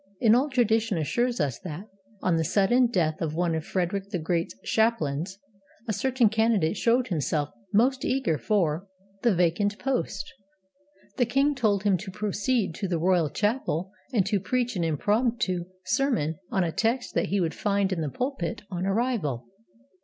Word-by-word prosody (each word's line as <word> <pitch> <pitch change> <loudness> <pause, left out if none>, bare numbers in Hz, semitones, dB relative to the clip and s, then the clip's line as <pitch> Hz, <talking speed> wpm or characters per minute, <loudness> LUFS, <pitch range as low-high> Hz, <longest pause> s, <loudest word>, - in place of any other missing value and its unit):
An 225 -2 +5
old 270 +5 +2
tradition 225 -4 +2
assures 240 - 0
us 140 -6 -1
that, 175 +3 -7 0.4
on 180 - +2
the 165 - +1
sudden 230 +9 +3
death 165 -9 0
of 155 -2 -2
one 170 0 +1
of 160 -1 -2
Frederick 190 +3 -2
the 200 - -2
Great's 165 -4 -1
chaplains, 190 -6 0 0.5
a 215 - 0
certain 250 +3 +2
candidate 220 -5 +2
showed 240 +2 +2
himself 150 -3 0 0.2
most 255 +5 +3
eager 250 - 0
for 185 -4 0 0.3
the 235 -5 +3
vacant 180 +4 +1
post. 250 -7 -2 0.8
The 245 -3 +2
king 275 +4 +2
told 215 -7 +1
him 200 -3 +3
to 195 +2 -7
proceed 210 +1 -1
to 200 - -2
the 175 -2 0
royal 175 -2 +2
chapel 205 - -1 0.2
and 210 -8 +2
to 200 0 +1
preach 245 +3 -1
an 175 - 0
impromptu 200 - 0 0.2
sermon 185 - 0
on 190 - +1
a 165 - -1
text 235 +7 0
that - - +1
he 200 - 0
would 165 -3 0
find 200 -2 0
in 170 - -2
the 150 - -1
pulpit 245 - -3
on 180 +1 -2
arrival. 195 - -1
200 Hz, 170 wpm, -27 LUFS, 170-235 Hz, 0.8 s, An